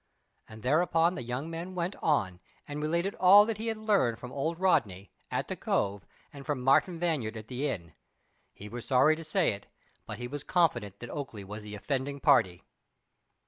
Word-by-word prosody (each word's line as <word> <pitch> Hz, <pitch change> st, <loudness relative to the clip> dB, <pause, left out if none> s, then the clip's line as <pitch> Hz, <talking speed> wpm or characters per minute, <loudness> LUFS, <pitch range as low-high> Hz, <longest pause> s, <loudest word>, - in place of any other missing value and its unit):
And 110 Hz, 0 st, -12 dB
thereupon 165 Hz, +5 st, +3 dB
the 175 Hz, -, -5 dB
young 125 Hz, +5 st, -4 dB
man 170 Hz, +3 st, -6 dB
went 175 Hz, +2 st, -2 dB
on 95 Hz, -, +1 dB, 0.3 s
and 145 Hz, +1 st, -5 dB
related 170 Hz, +6 st, 0 dB
all 195 Hz, +3 st, +8 dB
that 220 Hz, -1 st, -3 dB
he 225 Hz, -, -4 dB
had 225 Hz, -1 st, -1 dB
learned 200 Hz, -, +2 dB
from 125 Hz, +1 st, -9 dB
old 160 Hz, +5 st, -2 dB
Rodney, 110 Hz, -, +1 dB, 0.2 s
at -, -, -2 dB
the -, -, -3 dB
Cove, 100 Hz, -3 st, -1 dB, 0.3 s
and 140 Hz, -1 st, -9 dB
from 145 Hz, -2 st, -2 dB
Martin 135 Hz, +7 st, +3 dB
Vanyard 145 Hz, -11 st, -1 dB
at 110 Hz, 0 st, -10 dB
the 130 Hz, +4 st, -2 dB
inn. 85 Hz, -, -5 dB, 0.6 s
He 105 Hz, -, -11 dB
was 120 Hz, +2 st, -7 dB
sorry 145 Hz, +4 st, +4 dB
to 165 Hz, -, -8 dB
say 170 Hz, +3 st, +1 dB
it, 100 Hz, 0 st, -8 dB, 0.4 s
but 105 Hz, -, -6 dB
he 120 Hz, +1 st, -5 dB
was 145 Hz, +2 st, -6 dB
confident 120 Hz, -, 0 dB
that 120 Hz, -, -7 dB
Oakleigh 135 Hz, -9 st, -6 dB
was 105 Hz, +2 st, -7 dB
the 105 Hz, 0 st, -8 dB
offending 140 Hz, +5 st, -3 dB
party. 115 Hz, -, +3 dB
140 Hz, 190 wpm, -29 LUFS, 110-170 Hz, 0.6 s, all